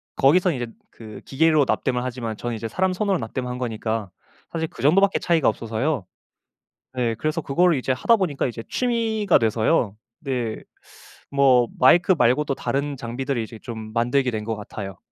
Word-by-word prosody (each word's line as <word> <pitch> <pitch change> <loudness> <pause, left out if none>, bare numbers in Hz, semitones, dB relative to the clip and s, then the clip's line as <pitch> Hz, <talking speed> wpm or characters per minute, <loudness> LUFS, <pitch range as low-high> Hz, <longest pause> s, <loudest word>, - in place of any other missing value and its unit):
거기서 175 +6 +4
이제 125 -4 -3 0.2
그 110 -2 -11
기계로 155 0 +3
납땜을 125 -2 0
하지만 120 -3 -4
저는 120 -1 -3
이제 115 +1 -4
사람 185 +9 0
손으로 195 -1 0
납땜을 125 +3 -4
한 125 0 -5
거니까 110 -3 -3 0.4
사실 160 -1 -2
그 - - -12
정도 155 +8 +5
밖에 200 0 +3
차이가 165 -4 +2
없어서요. 115 - -1 0.9
예. 115 -2 0
그래서 155 +2 -1
그거를 165 +3 +2
이제 130 +1 -1
하다 230 - +3
보니까 165 -10 -1
이제 115 -1 -6
취미가 225 -5 +1
돼서요. 110 0 +1 0.3
네. 125 -6 -2 0.8
뭐 130 -4 +4
마이크 175 +8 +6
말고도 135 +3 +2
다른 140 0 -2
장비들을 125 +2 -3
이제 110 0 -10
좀 110 -3 -7
만들게 125 +2 +1
된 110 -1 -3
것 110 0 -3
같아요. 100 -2 -7
130 Hz, 365 characters per minute, -23 LUFS, 115-160 Hz, 0.9 s, 마이크